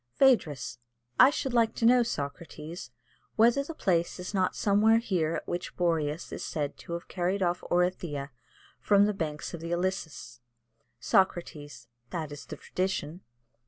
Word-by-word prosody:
"Phædrus. 150 - +3 0.4
I 260 - +9
should 275 -3 -3
like 230 -2 +3
to 230 - 0
know, 245 +1 +6
Socrates, 160 -3 -5 0.5
whether 235 +5 +4
the 320 +3 -8
place 170 - 0
is 180 +3 -6
not 185 -2 +1
somewhere 215 +2 +4
here 175 -8 0
at - - -5
which 175 +1 -4
Boreas 165 -3 0
is - - -5
said 145 -2 -3
to 170 - -7
have 170 +1 -5
carried 185 +2 -1
off 175 0 0
Orithyia 175 -6 0 0.5
from 200 -1 +4
the 210 - +1
banks 155 -5 -4
of 170 - -6
the 165 - -5
Ilissus? 175 -9 -3 0.6
"Socrates. 145 -4 0 0.2
That 160 -4 -4
is 145 - -9
the - - -7
tradition. 185 -2 -3
175 Hz, 155 wpm, -29 LUFS, 155-200 Hz, 0.6 s, I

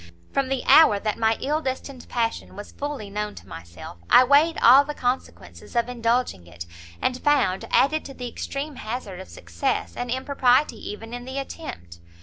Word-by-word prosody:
From 275 -1 +1
the 270 -1 -1
hour 310 -10 +7
that 215 +1 -3
my 225 0 +2
ill 300 +4 0
destined 260 -1 -5
passion 230 -2 -2
was 205 - -9
fully 280 -8 -6
known 210 0 -4
to - - -13
myself, 85 +1 -10
I 255 - +8
weighed 290 +6 +4
all 260 +4 +8
the 295 +1 -6
consequences 250 0 -4
of 235 0 +2
indulging 235 - -1
it, 85 0 -9 0.3
and 255 0 -1
found, 290 -11 +1
added 310 +3 +3
to 275 - -9
the 250 -1 -6
extreme 275 +4 -5
hazard 215 -5 -6
of 190 - -10
success, 85 0 -3
an 245 - -4
impropriety 260 -1 +1
even 225 +3 -8
in 245 0 -6
the 260 +1 -6
attempt. 85 - -7
245 Hz, 175 wpm, -24 LUFS, 210-275 Hz, 0.3 s, I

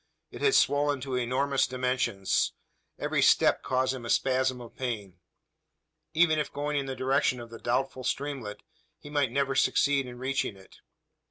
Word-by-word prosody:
It - - -9
had 425 -1 +4
swollen 145 -1 +3
to 135 0 -5
enormous 130 +3 +1
dimensions. 125 -6 0 0.4
Every - - 0
step - - +4
caused 130 0 0
him 130 -2 -7
a 115 - -6
spasm 130 0 +1
of 120 -1 -11
pain. 105 -8 -4 1.0
Even 160 -1 +4
if 150 - -2
going 145 +1 -3
in 140 -1 -1
the 135 - -4
direction 130 -1 +1
of 120 -1 -10
the 115 - -9
doubtful 130 +1 -1
streamlet, 135 -5 -3 0.3
he 145 - -12
might 145 -4 +1
never 140 +1 0
succeed 140 0 +2
in 120 -1 -9
reaching 130 -5 -2
it? 95 - -17
130 Hz, 165 wpm, -28 LUFS, 125-140 Hz, 1.0 s, had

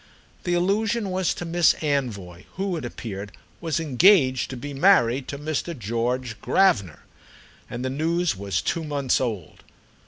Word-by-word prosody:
The 175 -1 +1
allusion 205 +4 0
was 185 -1 0
to 175 - -6
Miss 170 0 +3
Anvoy, 105 - -3
who, 190 -1 -2
it 155 - -5
appeared, 100 -5 -7 0.3
was 165 -1 -1
engaged 145 - +4
to 130 - -6
be 145 +3 -6
married 135 -6 +3
to 140 - -5
Mr. 155 +2 -3
George 115 +1 -2
Gravener; 100 - +2 0.7
and 120 +2 -5
the 130 - -1
news 165 0 0
was 95 -2 -2
two 165 - -1
months 140 -5 0
old. 110 -10 -4
140 Hz, 150 wpm, -24 LUFS, 115-175 Hz, 0.7 s, engaged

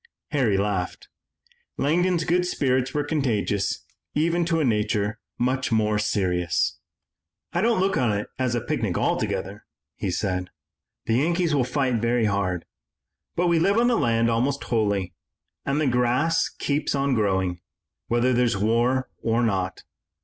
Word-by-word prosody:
Harry 125 -9 +2
laughed. 100 -2 -2 0.7
Langdon's 175 +3 +2
good 180 +2 +2
spirits 130 -5 0
were 150 - 0
contagious 120 -9 -1 0.3
even 170 +3 +2
to 165 -1 +1
a 155 - +2
nature 105 -1 0 0.2
much 130 +1 0
more 105 -1 +2
serious. 90 -5 0 0.7
"I - - +1
don't 230 -2 +2
look 190 +1 +1
on 120 -4 +2
it 105 0 -2
as 125 -2 0
a 120 - 0
picnic - - -1
altogether," 100 +3 -1 0.3
he 100 - -3
said. 90 -1 -2 0.6
"The 115 +1 +2
Yankees 170 +3 +1
will 140 -3 +3
fight 125 -3 0
very 115 0 +2
hard, 95 -4 -1 0.7
but 175 - +1
we 170 -1 +3
live 200 +6 +3
on 240 +1 +4
the 240 - +3
land 115 - +2
almost 125 +5 0
wholly, 100 -6 0 0.5
and 140 +2 +1
the 155 - +1
grass 125 +6 +2
keeps 145 0 -1
on 140 0 +1
growing, 95 -5 0 0.5
whether 120 +2 +2
there's 120 -3 +2
war 120 +5 +1
or 115 +1 +1
not. 95 -4 -1
120 Hz, 150 wpm, -24 LUFS, 105-145 Hz, 0.7 s, on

